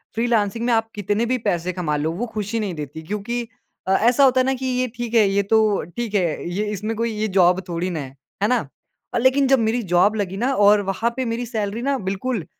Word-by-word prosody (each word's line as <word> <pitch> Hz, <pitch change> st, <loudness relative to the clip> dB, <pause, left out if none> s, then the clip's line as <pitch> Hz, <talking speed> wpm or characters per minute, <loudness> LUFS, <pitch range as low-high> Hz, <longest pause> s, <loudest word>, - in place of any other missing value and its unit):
Freelancing 230 Hz, -1 st, 0 dB
में 240 Hz, -, +2 dB
आप 225 Hz, 0 st, +1 dB
कितने 205 Hz, +2 st, 0 dB
भी 255 Hz, +2 st, 0 dB
पैसे 180 Hz, -5 st, -1 dB
कमा 165 Hz, -5 st, -2 dB
लो, 155 Hz, +2 st, -1 dB
वो 200 Hz, +8 st, -3 dB
खुशी 215 Hz, +1 st, -2 dB
नहीं 205 Hz, -5 st, -2 dB
देती 150 Hz, +1 st, -7 dB
क्योंकि 210 Hz, +6 st, -3 dB, 0.4 s
अ, -, -, +1 dB
ऐसा 240 Hz, +7 st, +4 dB
होता 260 Hz, -1 st, +5 dB
है -, -, 0 dB
ना 265 Hz, -, +1 dB
कि 260 Hz, 0 st, -5 dB
ये 255 Hz, 0 st, 0 dB
ठीक 240 Hz, -1 st, -5 dB
है, 220 Hz, -3 st, +5 dB
ये 200 Hz, +1 st, +1 dB
तो 215 Hz, 0 st, +2 dB
ठीक 235 Hz, -3 st, -3 dB
है, 175 Hz, -3 st, 0 dB
ये 200 Hz, +4 st, -2 dB
इसमें 210 Hz, +2 st, -3 dB
कोई 230 Hz, +1 st, -1 dB
ये 215 Hz, 0 st, -1 dB
जॉब 180 Hz, +1 st, +5 dB
थोड़ी 175 Hz, +2 st, -2 dB
ना 165 Hz, -4 st, -3 dB
है, 135 Hz, -1 st, -8 dB, 0.3 s
है 205 Hz, -, +4 dB
ना? 250 Hz, -, +3 dB, 0.6 s
अ, -, -, +1 dB
लेकिन 260 Hz, +2 st, +3 dB
जब 270 Hz, -1 st, +4 dB
मेरी 225 Hz, +2 st, +1 dB
जॉब 200 Hz, +5 st, +4 dB
लगी 195 Hz, -2 st, -3 dB
ना 255 Hz, +5 st, 0 dB
और 205 Hz, -3 st, +5 dB
वहाँ 225 Hz, +4 st, 0 dB
पे 260 Hz, 0 st, -2 dB
मेरी 235 Hz, +1 st, -2 dB
सैलरी 215 Hz, -1 st, -3 dB
ना 275 Hz, +1 st, 0 dB
बिल्कुल, 200 Hz, -1 st, -2 dB
215 Hz, 240 wpm, -22 LUFS, 195-240 Hz, 0.6 s, होता